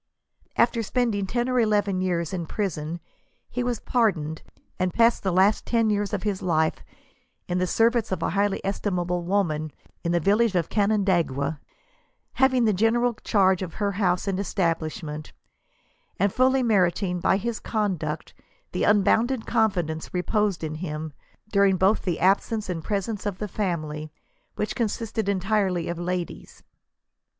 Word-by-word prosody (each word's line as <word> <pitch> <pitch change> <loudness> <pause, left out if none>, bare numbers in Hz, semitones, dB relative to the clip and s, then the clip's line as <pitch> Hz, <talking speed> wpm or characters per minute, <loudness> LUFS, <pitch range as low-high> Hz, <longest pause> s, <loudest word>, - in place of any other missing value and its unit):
'* - - -32
After 235 -1 -4
spending 220 -3 0
ten 240 +4 -1
or 255 -1 +1
eleven 205 -4 +2
years 175 -2 -1
in 170 -3 -3
prisQn 170 -5 -3 0.5
he 245 - -2
was 245 -2 -1
pardoned, 170 -11 0 0.4
and 185 0 +1
passed 230 0 +4
the 190 - 0
last 190 +4 +3
teii 230 -2 +2
years 205 -1 0
of 205 - -2
his 205 -3 -1
life 160 -3 +1 0.6
in 180 0 -1
the 185 - +1
service 230 +3 +2
of 175 -3 -2
a - - 0
highly 200 0 +1
estimable 180 -3 -1
woman 170 -5 0 0.3
in 170 - 0
the 175 - +3
village 205 +4 +2
of 170 -3 +1
Canandaigua, 175 -9 +1 0.7
having 260 -2 +3
the 215 - +3
general 235 +5 +2
charge 190 -3 +3
of 175 -4 -5
her 205 -1 0
house 185 -2 0
and 195 -1 0
establishment, 160 -5 -2 0.8
and 200 +1 +1
fully 260 +1 +3
merit 195 -5 +2
ing, 180 -2 -1
by 190 - +3
his 230 +2 -3
conduct, 210 -5 -2 0.4
the - - -1
unbounded 220 +4 +3
confidence 175 -9 0
reposed 200 0 0
in 155 -1 -3
him, 155 -2 -5 0.4
during 200 -2 +4
both 190 +4 +3
the 175 -3 -2
absence 200 +3 +1
and 165 -3 -4
presence 205 +2 -2
of 200 -3 -3
the 210 - -4
family, 155 -6 -3 0.4
which, - - -2
consisted 220 -2 -2
entirely 190 -3 0
of 170 0 -3
ladies." 180 0 -5
195 Hz, 155 wpm, -25 LUFS, 175-215 Hz, 0.8 s, passed